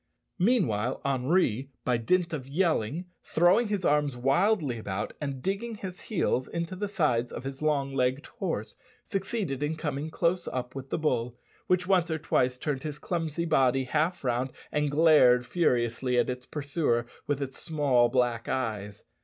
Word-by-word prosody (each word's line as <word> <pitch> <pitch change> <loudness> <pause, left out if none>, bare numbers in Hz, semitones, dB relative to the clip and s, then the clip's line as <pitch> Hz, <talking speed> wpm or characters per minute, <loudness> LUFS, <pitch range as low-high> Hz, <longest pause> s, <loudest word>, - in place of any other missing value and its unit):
Meanwhile, 145 - +2
Henri, 135 - +1 0.2
by 125 -1 +2
dint 170 +8 +1
of 135 -4 -4
yelling, 160 - 0 0.2
throwing 180 +8 +3
his 205 -4 -1
arms 145 -3 +2
wildly 140 - +2
about, 100 -3 -4
and 140 -3 -4
digging 210 +4 -2
his 185 -3 -7
heels 165 - 0
into 170 +2 -4
the 205 +2 -2
sides 145 - +1
of - - -6
his 135 +1 -6
long 140 -3 +1
legged 130 +1 0
horse, 165 - -4 0.3
succeeded 195 - -2
in 150 +2 0
coming 150 -1 -3
close 175 +2 0
up 125 -1 -4
with 135 0 -7
the - - -1
bull, 125 -6 -1 0.3
which 180 0 +2
once 180 -2 +3
or 160 - 0
twice 125 -4 +1
turned 140 -1 -2
his 150 -2 -5
clumsy 165 0 -2
body 135 -4 +3
half 155 +7 0
round 125 +1 0 0.2
and 150 -1 +1
glared 145 -5 +5
furiously 125 -4 +1
at 120 +1 +2
its 125 0 -7
pursuer 140 -5 0 0.2
with 145 -1 0
its 135 -2 -5
small 140 -7 +2
black 120 -2 0
eyes. 105 -6 -3
145 Hz, 160 wpm, -28 LUFS, 125-170 Hz, 0.3 s, glared